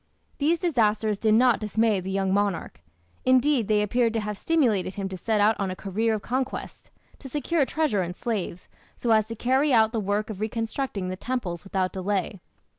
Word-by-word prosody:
These 310 Hz, +4 st, +2 dB
disasters 220 Hz, -, +1 dB
did 220 Hz, -1 st, +3 dB
not 245 Hz, 0 st, +4 dB
dismay 215 Hz, -1 st, +1 dB
the 185 Hz, +1 st, -6 dB
young 190 Hz, 0 st, 0 dB
monarch. 200 Hz, -, -1 dB, 0.4 s
Indeed, 255 Hz, -2 st, +3 dB
they 210 Hz, -1 st, +3 dB
appear 235 Hz, +3 st, +2 dB
to 225 Hz, 0 st, -1 dB
have 210 Hz, -1 st, -3 dB
stimulated 215 Hz, -, +1 dB
him 195 Hz, -1 st, -3 dB
to 190 Hz, -, -5 dB
set 215 Hz, +4 st, -1 dB
out 210 Hz, +2 st, +4 dB
on 195 Hz, -2 st, -1 dB
a 185 Hz, -, -4 dB
career 220 Hz, +4 st, -1 dB
of 210 Hz, -, -6 dB
conquest, 260 Hz, +2 st, -4 dB, 0.3 s
to 270 Hz, -, -9 dB
secure 295 Hz, +3 st, 0 dB
treasure 305 Hz, -11 st, 0 dB
and 180 Hz, 0 st, -4 dB
slaves, 200 Hz, -7 st, -4 dB, 0.3 s
so 235 Hz, -, -1 dB
as 215 Hz, -1 st, +4 dB
to 230 Hz, -, -6 dB
carry 260 Hz, +6 st, +2 dB
out 220 Hz, -3 st, +4 dB
the 230 Hz, -, -1 dB
work 205 Hz, +2 st, -1 dB
of 205 Hz, -1 st, -8 dB
reconstructing 225 Hz, -2 st, -3 dB
the 185 Hz, -, -3 dB
temples 185 Hz, -7 st, -4 dB
without 190 Hz, -1 st, -1 dB
delay. 190 Hz, 0 st, -2 dB
215 Hz, 190 wpm, -25 LUFS, 195-245 Hz, 0.4 s, not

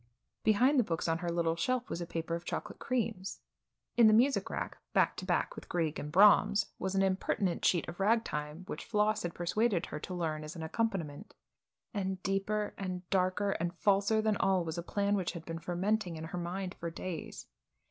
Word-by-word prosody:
Behind 250 Hz, +6 st, +4 dB
the -, -, +5 dB
books 165 Hz, -5 st, -2 dB
on 165 Hz, 0 st, +1 dB
her 175 Hz, 0 st, -2 dB
little 170 Hz, -1 st, +1 dB
shelf 250 Hz, +8 st, 0 dB
was 170 Hz, -, -4 dB
a 170 Hz, -, -4 dB
paper 165 Hz, 0 st, -3 dB
of 170 Hz, 0 st, -2 dB
chocolate -, -, -5 dB
creams; 225 Hz, -6 st, -2 dB, 0.5 s
in 235 Hz, -2 st, +7 dB
the 215 Hz, -, +6 dB
music 265 Hz, +5 st, +3 dB
rack, -, -, -4 dB
back -, -, +3 dB
to -, -, -5 dB
back -, -, 0 dB
with -, -, -10 dB
Grieg 160 Hz, -3 st, -1 dB
and 150 Hz, -, -5 dB
Brahms, 205 Hz, +2 st, +5 dB
was 190 Hz, 0 st, -2 dB
an 195 Hz, -, +3 dB
impertinent 190 Hz, -1 st, 0 dB
sheet 175 Hz, -, +3 dB
of 175 Hz, -, -7 dB
ragtime 185 Hz, -7 st, 0 dB
which -, -, -6 dB
Floss 215 Hz, 0 st, +1 dB
had 175 Hz, -1 st, -4 dB
persuaded 185 Hz, +2 st, +1 dB
her 150 Hz, -, -6 dB
to 180 Hz, -, -6 dB
learn 155 Hz, -3 st, -2 dB
as 155 Hz, +2 st, -7 dB
an 165 Hz, -, -5 dB
accompaniment. 185 Hz, -3 st, -2 dB, 0.6 s
And 190 Hz, -3 st, -2 dB
deeper 205 Hz, +2 st, 0 dB
and 185 Hz, -2 st, -4 dB
darker 190 Hz, +2 st, +2 dB
and 170 Hz, -1 st, -2 dB
falser 200 Hz, +3 st, +3 dB
than 215 Hz, -2 st, +2 dB
all 190 Hz, -3 st, +2 dB
was 165 Hz, +1 st, -3 dB
a -, -, -1 dB
plan 200 Hz, +3 st, 0 dB
which 190 Hz, -4 st, 0 dB
had 165 Hz, -2 st, -8 dB
been 165 Hz, 0 st, -5 dB
fermenting 180 Hz, +2 st, -1 dB
in 160 Hz, -, -6 dB
her 160 Hz, +2 st, -4 dB
mind 180 Hz, +2 st, -3 dB
for 170 Hz, -, -3 dB
days. 165 Hz, -1 st, -6 dB
185 Hz, 200 wpm, -32 LUFS, 170-210 Hz, 0.6 s, in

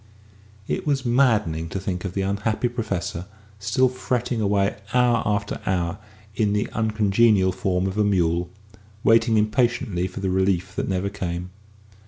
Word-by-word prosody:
It -, -, -3 dB
was 135 Hz, -3 st, 0 dB
maddening 110 Hz, -, +2 dB
to 95 Hz, -, -3 dB
think 90 Hz, -1 st, -4 dB
of 95 Hz, -, -5 dB
the 95 Hz, -, 0 dB
unhappy 100 Hz, +5 st, 0 dB
Professor 100 Hz, -7 st, -3 dB, 0.3 s
still 120 Hz, +6 st, +2 dB
fretting 125 Hz, -2 st, -2 dB
away 100 Hz, -1 st, +1 dB, 0.2 s
hour 120 Hz, -2 st, +4 dB
after 105 Hz, -1 st, -1 dB
hour 95 Hz, +1 st, -1 dB, 0.4 s
in 105 Hz, -1 st, +1 dB
the 105 Hz, 0 st, 0 dB
uncongenial 110 Hz, -2 st, +3 dB
form 95 Hz, 0 st, -1 dB
of 95 Hz, +2 st, -2 dB
a -, -, +4 dB
mule, 90 Hz, -3 st, +1 dB, 0.5 s
waiting 115 Hz, 0 st, +4 dB
impatiently 105 Hz, -4 st, +1 dB
for 90 Hz, -, -8 dB
the 95 Hz, -1 st, -1 dB
relief 95 Hz, +1 st, 0 dB
that -, -, -2 dB
never 95 Hz, +1 st, -1 dB
came. 90 Hz, -2 st, -4 dB
100 Hz, 150 wpm, -23 LUFS, 95-115 Hz, 0.5 s, hour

